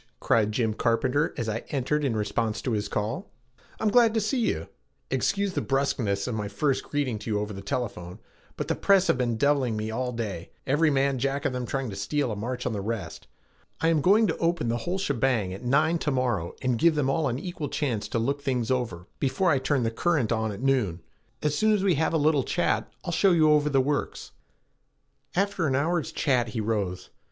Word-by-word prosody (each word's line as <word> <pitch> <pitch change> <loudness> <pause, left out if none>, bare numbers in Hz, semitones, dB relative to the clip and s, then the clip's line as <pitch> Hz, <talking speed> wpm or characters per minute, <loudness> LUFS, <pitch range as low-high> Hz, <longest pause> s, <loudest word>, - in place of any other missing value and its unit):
cried 105 -2 +2
Jim 110 -1 0
Carpenter 130 +8 +1
as 115 - -2
I 110 +1 -1
entered 145 +2 0
in 130 -5 0
response 110 +1 -1
to 130 - -1
his 105 -2 -1
call. 110 - -3 0.5
"I'm 215 - +2
glad 230 0 +5
to - - +3
see 220 +5 0
you. 230 - -1 0.4
Excuse 200 -1 0
the - - -1
bruskness 120 -8 0
of 125 - -2
my 105 -2 -2
first 130 +7 0
greeting 135 -7 -1
to 115 - -7
you 105 -1 +1
over 105 0 -4
the 100 - -7
telephone, 95 -6 -4 0.4
but - - -3
the - - +1
press 195 -2 +4
have - - +2
been 120 -2 0
deviling 135 -4 +2
me 110 +1 -3
all 125 +2 -2
day, 105 -8 -5 0.2
every 150 +4 +3
man 135 -2 +1
jack 140 +3 -1
of 130 - +1
them 125 -1 -3
trying 135 -4 -2
to - - -6
steal 120 +7 -1
a - - -2
march 125 +4 -4
on 125 - -1
the 100 - -3
rest. 110 0 -5 0.5
I 165 - +2
am 160 -3 +3
going 205 +8 +5
to 160 - -1
open 170 -7 0
the 120 - 0
whole 175 +10 -2
shebang 125 - 0
at 95 - -8
nine 155 +7 +2
to 150 - -1
morrow 120 - -1
and 125 -3 +1
give 170 -2 +4
them 145 -3 +1
all 150 +2 +1
an 120 -1 -1
equal 160 -1 -5
chance 120 -9 -2
to 110 - -2
look 140 +5 -1
things 125 -4 -1
over 115 -9 -2
before 140 +7 +1
I 140 - +3
turn 130 -1 +1
the 115 - 0
current 140 -2 +1
on 110 -1 0
at 100 +5 -7
noon. 115 -11 +1 0.4
As 150 -1 +1
soon 215 +6 +3
as 200 -2 +1
we 195 -2 +4
have 160 +1 +1
a 165 - +2
little 150 -2 +3
chat, 175 - 0
I'll 175 - -2
show 185 +2 +4
you 155 -2 +5
over 150 0 +3
the 135 -2 +3
works." 145 +2 -2 1.0
After 195 -2 +1
half - - +1
an 130 - +1
hour's 165 +4 0
chat 125 -5 +1
he 110 - -4
rose. 105 -4 -2
130 Hz, 225 wpm, -26 LUFS, 110-150 Hz, 1.0 s, glad